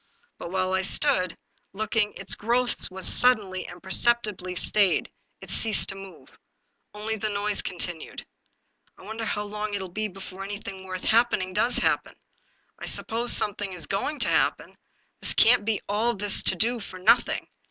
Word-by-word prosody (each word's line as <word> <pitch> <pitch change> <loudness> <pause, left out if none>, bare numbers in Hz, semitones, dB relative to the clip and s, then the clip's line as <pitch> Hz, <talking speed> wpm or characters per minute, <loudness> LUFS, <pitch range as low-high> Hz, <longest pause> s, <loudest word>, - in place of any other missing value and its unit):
But - - -6
while 185 0 -1
I 190 - +2
stood 185 - +1 0.4
looking 215 +1 -1
its - - -2
growth 240 +3 0
was 190 -1 -1
suddenly 205 -7 +3
and 175 - -12
perceptibly 195 -2 +2
stayed; 200 +1 +2 0.3
it - - -6
ceased 220 -3 +4
to 195 - -4
move. 195 -1 -13 0.6
Only 220 +1 -3
the 215 +1 -2
noise 205 0 -1
continued. 175 -2 -5 0.4
" - - -43
I - - -16
wonder 220 +3 -5
how 210 -1 -2
long 210 0 -4
it - - -2
will 190 -1 -6
be 215 +4 -3
before 195 0 -9
anything 195 -1 -7
worth 185 0 -6
happening 220 -5 +2
does 235 +5 +2
happen! - - 0 0.6
I - - -6
suppose 235 +2 +2
something 205 -2 0
is 170 -4 -2
going 200 - -2
to - - +5
happen; - - 0 0.5
there - - 0
can't 225 -2 +5
be 220 -2 -1
all 220 +4 0
this 205 +1 +1
to - - +4
do 240 +2 +1
for 195 -3 -9
nothing. 230 +6 +2
205 Hz, 170 wpm, -25 LUFS, 190-220 Hz, 0.6 s, to